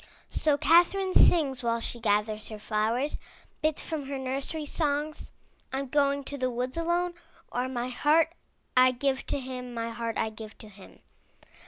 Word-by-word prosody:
So 300 Hz, -2 st, +2 dB
Catherine 355 Hz, +5 st, +4 dB
sings 280 Hz, -7 st, +5 dB
while 230 Hz, -1 st, 0 dB
she 235 Hz, +1 st, -4 dB
gathers 215 Hz, 0 st, 0 dB
her 215 Hz, -, -6 dB
flowers, 220 Hz, +6 st, 0 dB, 0.4 s
bits 310 Hz, -1 st, 0 dB
from 305 Hz, -4 st, -4 dB
her 275 Hz, 0 st, -3 dB
nursery 275 Hz, +4 st, -3 dB
songs: 295 Hz, 0 st, -1 dB, 0.4 s
'Tm 265 Hz, 0 st, -3 dB
going 280 Hz, -1 st, +2 dB
to 285 Hz, +1 st, -6 dB
the 255 Hz, 0 st, +1 dB
woods 250 Hz, +1 st, -3 dB
alone,'* 345 Hz, +1 st, 0 dB, 0.4 s
or 250 Hz, +1 st, -1 dB
*'My 245 Hz, -1 st, -2 dB
heart 310 Hz, +6 st, +3 dB, 0.4 s
I 255 Hz, 0 st, +6 dB
give 265 Hz, +1 st, -1 dB
to -, -, -1 dB
him, 250 Hz, -2 st, -6 dB
My 230 Hz, 0 st, -2 dB
heart 230 Hz, 0 st, -3 dB
I 220 Hz, -, 0 dB
give 215 Hz, 0 st, -10 dB
to 215 Hz, -, -12 dB
him.'' 195 Hz, -2 st, -15 dB
260 Hz, 165 wpm, -28 LUFS, 235-295 Hz, 0.4 s, I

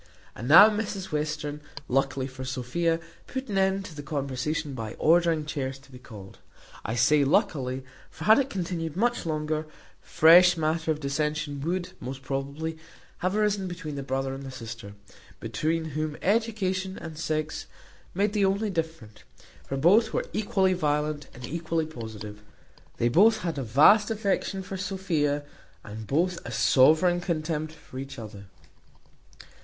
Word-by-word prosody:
And 115 Hz, -, -6 dB
now 170 Hz, +9 st, +10 dB
Mrs 210 Hz, -3 st, -3 dB
Western, 150 Hz, -1 st, -3 dB, 0.3 s
luckily 135 Hz, 0 st, 0 dB
for 130 Hz, 0 st, -8 dB
Sophia, 130 Hz, +6 st, -1 dB, 0.3 s
put 260 Hz, -2 st, -5 dB
an 200 Hz, -, -1 dB
end 190 Hz, 0 st, +1 dB
to 175 Hz, -, -9 dB
the 145 Hz, -, -7 dB
conversation 140 Hz, +1 st, -3 dB
by 115 Hz, -4 st, -6 dB
ordering 165 Hz, -1 st, +3 dB
chairs 135 Hz, -3 st, -3 dB
to 135 Hz, 0 st, -20 dB
be 125 Hz, -, -11 dB
called. 105 Hz, -6 st, -12 dB, 0.4 s
I 110 Hz, -, -3 dB
say 140 Hz, +5 st, +4 dB
luckily, 135 Hz, -, 0 dB, 0.2 s
for -, -, -10 dB
had 220 Hz, +3 st, +6 dB
it 275 Hz, -1 st, 0 dB
continued 170 Hz, -, -3 dB
much 240 Hz, -3 st, 0 dB
longer, 155 Hz, 0 st, -2 dB, 0.3 s
fresh 175 Hz, +2 st, +6 dB
matter 160 Hz, +1 st, -1 dB
of 155 Hz, -1 st, +1 dB
dissension 150 Hz, 0 st, -2 dB
would, 175 Hz, +4 st, -2 dB
most 135 Hz, +1 st, -7 dB
probably, 140 Hz, +4 st, -4 dB, 0.4 s
have 185 Hz, +2 st, -1 dB
arisen 205 Hz, -2 st, +1 dB
between 175 Hz, -4 st, -6 dB
the 140 Hz, -, -4 dB
brother 135 Hz, 0 st, -2 dB
and 135 Hz, 0 st, -7 dB
sister; 115 Hz, -4 st, -8 dB, 0.5 s
between 155 Hz, +9 st, -1 dB
whom 155 Hz, 0 st, -2 dB
education 195 Hz, -3 st, 0 dB
and 165 Hz, -2 st, -8 dB
sex 155 Hz, -1 st, -3 dB, 0.5 s
made 200 Hz, +2 st, +1 dB
the 205 Hz, -2 st, +2 dB
only 200 Hz, +2 st, 0 dB
difference; 160 Hz, -, -4 dB, 0.5 s
for 135 Hz, -, -3 dB
both 210 Hz, -, +4 dB
were -, -, 0 dB
equally 195 Hz, -3 st, +2 dB
violent 150 Hz, -3 st, -1 dB
and 125 Hz, 0 st, -8 dB
equally 165 Hz, +2 st, -2 dB
positive: 110 Hz, -7 st, -8 dB, 0.6 s
they -, -, 0 dB
had 120 Hz, -, +2 dB
both 220 Hz, +2 st, +5 dB
a 160 Hz, -5 st, -2 dB
vast 155 Hz, -, +5 dB
affection 200 Hz, -3 st, -1 dB
for 190 Hz, +1 st, -6 dB
Sophia, 170 Hz, -7 st, -1 dB, 0.4 s
and 110 Hz, 0 st, -8 dB
both 175 Hz, +4 st, +1 dB
a -, -, -7 dB
sovereign 160 Hz, +6 st, +4 dB
contempt 155 Hz, -3 st, -2 dB
for 150 Hz, -4 st, -11 dB
each 135 Hz, 0 st, -7 dB
other. 105 Hz, -3 st, -9 dB
155 Hz, 150 wpm, -27 LUFS, 135-185 Hz, 0.6 s, now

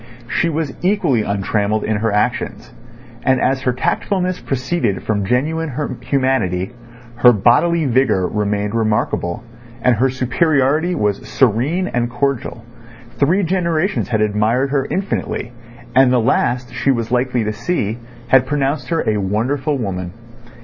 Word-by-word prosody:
She 170 Hz, +7 st, 0 dB
was 155 Hz, -3 st, -2 dB
equally 180 Hz, -, +2 dB
untrammelled 100 Hz, +1 st, -1 dB
in 110 Hz, -1 st, 0 dB
her 110 Hz, +1 st, 0 dB
actions; 105 Hz, +1 st, -2 dB, 0.5 s
and 130 Hz, +1 st, +2 dB
as 130 Hz, +1 st, +1 dB
her 130 Hz, -, +1 dB
tactfulness 180 Hz, +8 st, -1 dB
proceeded 130 Hz, -, -2 dB
from 105 Hz, -2 st, -1 dB
genuine 150 Hz, +6 st, 0 dB, 0.3 s
humanity, 130 Hz, -10 st, 0 dB, 0.5 s
her 125 Hz, 0 st, +7 dB
bodily 125 Hz, -, +3 dB
vigour 120 Hz, -7 st, +2 dB
remained 105 Hz, 0 st, -1 dB
remarkable 110 Hz, -4 st, -1 dB, 0.4 s
and 125 Hz, +1 st, +3 dB
her 130 Hz, +4 st, +2 dB
superiority 140 Hz, +5 st, +1 dB
was 105 Hz, -1 st, -1 dB
serene 135 Hz, -, +1 dB
and 120 Hz, -5 st, -1 dB
cordial, 120 Hz, -2 st, -2 dB, 0.5 s
three 175 Hz, +8 st, +3 dB
generations 175 Hz, +1 st, 0 dB
had 110 Hz, -3 st, +1 dB
admired 110 Hz, +6 st, +1 dB
her 140 Hz, -2 st, 0 dB
infinitely, 190 Hz, -10 st, -3 dB, 0.4 s
and 130 Hz, 0 st, +5 dB
the 125 Hz, -, +3 dB
last 120 Hz, 0 st, 0 dB
she -, -, -1 dB
was 115 Hz, -3 st, 0 dB
likely 125 Hz, -1 st, +1 dB
to 105 Hz, 0 st, -2 dB
see 115 Hz, -, -2 dB, 0.3 s
had 130 Hz, -1 st, +5 dB
pronounced 140 Hz, -2 st, -1 dB
her 165 Hz, -, -1 dB
a 110 Hz, -1 st, +2 dB
wonderful 125 Hz, +9 st, -1 dB
woman. 90 Hz, -6 st, -4 dB
125 Hz, 135 wpm, -18 LUFS, 110-145 Hz, 0.5 s, her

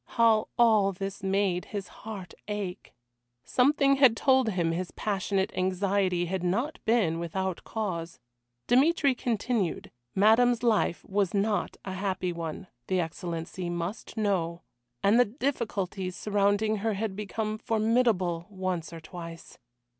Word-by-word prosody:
How 225 Hz, -2 st, +4 dB
all 215 Hz, -4 st, +5 dB
this 195 Hz, +2 st, -5 dB
made 190 Hz, -2 st, 0 dB
his 200 Hz, -3 st, -5 dB
heart 205 Hz, -4 st, -7 dB
ache! 205 Hz, -3 st, -5 dB, 0.5 s
Something 275 Hz, -, +3 dB
had 260 Hz, -5 st, +6 dB
told 260 Hz, -3 st, +4 dB
him 175 Hz, -5 st, 0 dB
his 175 Hz, +2 st, -2 dB
passionate 195 Hz, -1 st, -1 dB
anxiety 185 Hz, -1 st, +1 dB
had 185 Hz, +1 st, -2 dB
not 225 Hz, -, -1 dB
been 200 Hz, -8 st, +2 dB
without 185 Hz, +2 st, -3 dB
cause. 175 Hz, -7 st, -4 dB, 0.5 s
Dmitry 280 Hz, +2 st, +4 dB
continued: 230 Hz, -5 st, -1 dB, 0.2 s
Madame's 230 Hz, +4 st, +4 dB
life 215 Hz, -7 st, +1 dB
was 200 Hz, -1 st, 0 dB
not 205 Hz, +1 st, 0 dB
a 190 Hz, -, -4 dB
happy 185 Hz, -2 st, -2 dB
one, 165 Hz, +2 st, -5 dB, 0.2 s
the 185 Hz, -, +1 dB
Excellency 170 Hz, +1 st, -4 dB
must 175 Hz, +7 st, -5 dB
know, 175 Hz, -5 st, 0 dB, 0.4 s
and 205 Hz, +4 st, +5 dB
the 245 Hz, -, +6 dB
difficulties 205 Hz, -7 st, -2 dB
surrounding 205 Hz, +2 st, +1 dB
her 215 Hz, +1 st, -1 dB
had 205 Hz, -1 st, -2 dB
become 215 Hz, +1 st, -3 dB
formidable 215 Hz, -7 st, +1 dB
once 185 Hz, -4 st, -3 dB
or 165 Hz, -1 st, -8 dB
twice. 165 Hz, -1 st, -10 dB
200 Hz, 130 wpm, -28 LUFS, 180-220 Hz, 0.5 s, had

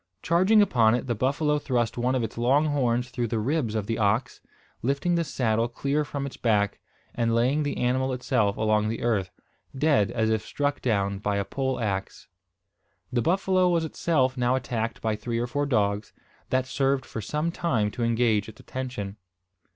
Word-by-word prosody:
Charging 185 Hz, +7 st, +5 dB
upon 115 Hz, -, +3 dB
it, 125 Hz, -, -2 dB
the 120 Hz, -, 0 dB
buffalo 145 Hz, +6 st, +1 dB
thrust 120 Hz, -6 st, -1 dB
one 125 Hz, +2 st, 0 dB
of 125 Hz, -, 0 dB
its 115 Hz, -, -4 dB
long 130 Hz, +6 st, +3 dB
horns 125 Hz, -4 st, 0 dB
through 120 Hz, 0 st, -1 dB
the 115 Hz, +1 st, -2 dB
ribs 120 Hz, 0 st, -1 dB
of 105 Hz, -2 st, -1 dB
the 115 Hz, +2 st, -2 dB
ox, 110 Hz, +4 st, 0 dB, 0.4 s
lifting 140 Hz, +7 st, 0 dB
the 170 Hz, -1 st, +2 dB
saddle 115 Hz, -6 st, 0 dB
clear 140 Hz, +5 st, -1 dB
from 140 Hz, -1 st, -4 dB
its 140 Hz, -, -7 dB
back, 105 Hz, -3 st, +1 dB, 0.3 s
and 115 Hz, -1 st, +1 dB
laying 130 Hz, +6 st, +2 dB
the 145 Hz, -1 st, -2 dB
animal 130 Hz, +2 st, +1 dB
itself 125 Hz, -5 st, 0 dB
along 110 Hz, -1 st, +2 dB
the 115 Hz, -, -4 dB
earth, 105 Hz, -6 st, +1 dB, 0.5 s
dead 140 Hz, -8 st, +3 dB
as 110 Hz, -1 st, 0 dB
if 110 Hz, -1 st, +1 dB
struck 145 Hz, +4 st, -2 dB
down 100 Hz, -4 st, 0 dB
by 105 Hz, 0 st, -1 dB
a 100 Hz, -, -1 dB
pole 130 Hz, +2 st, -2 dB
axe. 95 Hz, -4 st, -3 dB, 0.9 s
The 120 Hz, -, +2 dB
buffalo 185 Hz, +4 st, +2 dB
was 170 Hz, -2 st, +1 dB
itself 140 Hz, -5 st, +1 dB
now 125 Hz, 0 st, +1 dB
attacked 120 Hz, -3 st, -3 dB
by 110 Hz, -1 st, +1 dB
three 115 Hz, +2 st, -3 dB
or 120 Hz, -, 0 dB
four 145 Hz, +4 st, -1 dB
dogs, 105 Hz, -4 st, 0 dB, 0.4 s
that 130 Hz, 0 st, +1 dB
served 135 Hz, 0 st, 0 dB
for 110 Hz, -, -6 dB
some 150 Hz, +9 st, -2 dB
time 115 Hz, -13 st, 0 dB
to 120 Hz, +2 st, -3 dB
engage 115 Hz, -3 st, +1 dB
its 110 Hz, -, -14 dB
attention. 125 Hz, -6 st, -5 dB
125 Hz, 185 wpm, -26 LUFS, 110-140 Hz, 0.9 s, Charging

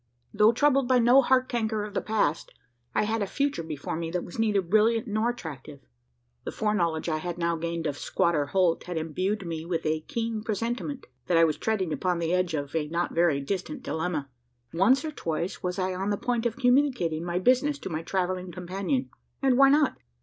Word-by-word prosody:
Though 210 Hz, +1 st, +5 dB
troubled 275 Hz, +1 st, +3 dB
by 255 Hz, 0 st, +4 dB
no 245 Hz, +3 st, +6 dB
heart 255 Hz, 0 st, +3 dB
canker 220 Hz, -3 st, -1 dB
of 210 Hz, -1 st, -7 dB
the -, -, 0 dB
past, 205 Hz, -8 st, 0 dB, 0.4 s
I -, -, +3 dB
had 220 Hz, +1 st, -1 dB
a 200 Hz, -, 0 dB
future 280 Hz, -1 st, -1 dB
before 155 Hz, -3 st, -5 dB
me 165 Hz, 0 st, -3 dB
that 175 Hz, +1 st, -2 dB
was 175 Hz, -, -9 dB
neither 210 Hz, -3 st, +2 dB
brilliant 220 Hz, +6 st, +3 dB
nor 215 Hz, +1 st, 0 dB
attractive. 150 Hz, -, -7 dB, 0.6 s
The -, -, -4 dB
foreknowledge 170 Hz, -8 st, 0 dB
I 155 Hz, -2 st, 0 dB
had 175 Hz, +1 st, -4 dB
now 170 Hz, -1 st, 0 dB
gained 165 Hz, 0 st, -3 dB
of 145 Hz, -2 st, -2 dB
squatter 155 Hz, -4 st, +1 dB
Holt, 175 Hz, +2 st, +1 dB
had 175 Hz, -1 st, -4 dB
imbued 185 Hz, +6 st, -2 dB
me 165 Hz, -2 st, -4 dB
with 165 Hz, -1 st, -3 dB
a 155 Hz, 0 st, +1 dB
keen 225 Hz, +3 st, -3 dB
presentiment, 235 Hz, +6 st, -3 dB, 0.2 s
that 175 Hz, -, +3 dB
I 165 Hz, -, +6 dB
was 155 Hz, -2 st, +3 dB
treading 195 Hz, -7 st, -1 dB
upon 180 Hz, +5 st, 0 dB
the 170 Hz, 0 st, -1 dB
edge 180 Hz, -3 st, +1 dB
of 145 Hz, 0 st, -4 dB
a 155 Hz, -2 st, 0 dB
not 170 Hz, +3 st, -2 dB
very 165 Hz, -4 st, +2 dB
distant 195 Hz, -, -4 dB
dilemma. 160 Hz, -2 st, -2 dB, 0.5 s
Once, 215 Hz, -, +3 dB
or 310 Hz, -, -3 dB
twice, 170 Hz, -, -3 dB
was 180 Hz, -1 st, -3 dB
I 185 Hz, -1 st, -1 dB
on 190 Hz, +2 st, -2 dB
the 205 Hz, -, 0 dB
point 240 Hz, 0 st, 0 dB
of 235 Hz, +1 st, -6 dB
communicating 245 Hz, -, +2 dB
my 175 Hz, 0 st, -2 dB
business 255 Hz, +9 st, +3 dB
to -, -, -7 dB
my 155 Hz, 0 st, -2 dB
travelling 185 Hz, +1 st, -2 dB
companion; 190 Hz, -, -2 dB, 0.3 s
and 265 Hz, -2 st, +3 dB
why 275 Hz, +1 st, +7 dB
not? 290 Hz, 0 st, +3 dB
185 Hz, 205 wpm, -27 LUFS, 165-230 Hz, 0.6 s, why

